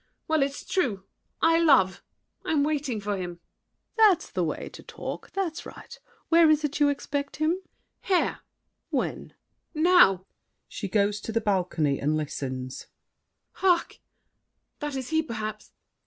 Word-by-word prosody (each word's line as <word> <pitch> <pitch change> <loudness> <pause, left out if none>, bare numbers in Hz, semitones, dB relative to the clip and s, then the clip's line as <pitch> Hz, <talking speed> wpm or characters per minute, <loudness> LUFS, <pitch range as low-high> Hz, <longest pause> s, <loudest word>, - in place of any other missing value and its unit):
Well, 315 -2 +2
it's 275 +1 -2
true! 230 - 0 0.4
I 330 0 +5
love! 270 - +4 0.4
I'm 300 -3 +1
waiting 285 -6 -1
for 205 0 -2
him! 175 -2 -5
SAVERNY. - - -48
That's 365 - -1
the 185 - 0
way 160 - -3
to - - -12
talk! - - -7
That's 355 -4 -2
right! - - -11 0.3
Where 330 -1 +6
is 305 0 +3
it 295 0 -2
you 290 -1 +5
expect 280 0 -3
him? 310 +1 +1
MARION. 370 - -4 0.4
Here! 375 - +2
SAVERNY. - - -5 0.5
When? - - -1
MARION. - - -14 0.4
Now! 310 - +5 0.4
[She 200 - -5
goes 205 +1 +1
to 225 - -5
the 230 - +1
balcony 180 -9 0
and 150 +2 +1
listens. 130 -4 -5 0.6
Hark! 360 -3 +1 0.8
that 295 -1 -4
is 260 -2 -4
he 320 0 +2
perhaps. 215 -7 -6
270 Hz, 155 wpm, -27 LUFS, 190-315 Hz, 0.8 s, Where